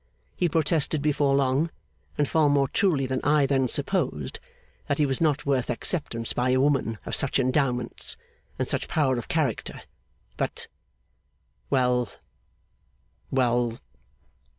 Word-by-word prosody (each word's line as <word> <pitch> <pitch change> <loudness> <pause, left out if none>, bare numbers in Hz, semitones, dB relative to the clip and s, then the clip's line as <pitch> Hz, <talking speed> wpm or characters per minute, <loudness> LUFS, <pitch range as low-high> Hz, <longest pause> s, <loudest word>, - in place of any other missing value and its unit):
He 175 - +1
protested 155 -1 +1
before 145 -2 +2
long, 140 +4 +2 0.5
and 145 - +2
far 155 -1 +3
more 140 -1 +3
truly 150 -4 +1
than 130 0 -2
I 145 -1 +4
then 135 -2 +2
supposed, 135 - 0 0.5
that 145 - 0
he 150 - +3
was 135 +1 -1
not 150 -3 +1
worth 135 -4 0
acceptance 120 -2 -1
by 125 +1 0
a 130 +1 +3
woman 135 -5 +1
of - - -5
such 140 - +2
endowments, 130 -2 0 0.4
and - - -1
such - - -1
power 130 -5 +1
of - - -8
character; 155 -9 -2 0.5
but - - -3 1.0
well, 125 -3 +2 1.2
well 120 -3 +1
135 Hz, 130 wpm, -26 LUFS, 125-150 Hz, 1.2 s, I